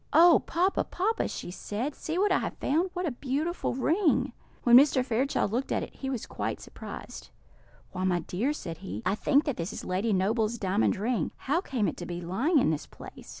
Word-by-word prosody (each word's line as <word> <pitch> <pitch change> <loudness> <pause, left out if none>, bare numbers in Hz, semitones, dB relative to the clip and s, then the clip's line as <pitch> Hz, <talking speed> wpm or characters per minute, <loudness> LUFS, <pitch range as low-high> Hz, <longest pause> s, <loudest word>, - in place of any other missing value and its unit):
"Oh, 335 +2 +7
papa, 365 +3 +1
papa!" 440 +5 0
she - - -6
said, 225 +9 -4
"see 320 +4 -4
what 400 +1 +3
I - - +4
have - - -4
found! 330 +7 +1
What 360 -1 -2
a 315 - 0
beautiful 285 +6 -2
ring!" 320 +6 +2 0.3
When 240 -1 +7
Mr. 265 -1 +6
Fairchild 250 -3 0
looked 250 +4 -2
at - - 0
it, - - -8
he 265 - -5
was 255 -5 -3
quite - - -4
surprised. - - -9 0.6
"Why, 185 0 -4
my 180 -2 +1
dear," 210 - -1
said 170 - -6
he, 100 +5 -6
"I 185 - +2
think 280 +7 +3
that 285 -5 -2
this 170 +2 -3
is - - -7
Lady 195 +5 0
Noble's 215 +4 +1
diamond 195 0 +1
ring; 210 -3 -1 0.2
how 300 +6 +2
came 245 - -1
it - - -3
to 175 - -6
be 175 0 -4
lying 225 - +1
in 255 - +4
this 155 - -3
place?" - - -12
250 Hz, 210 wpm, -28 LUFS, 190-305 Hz, 0.6 s, Oh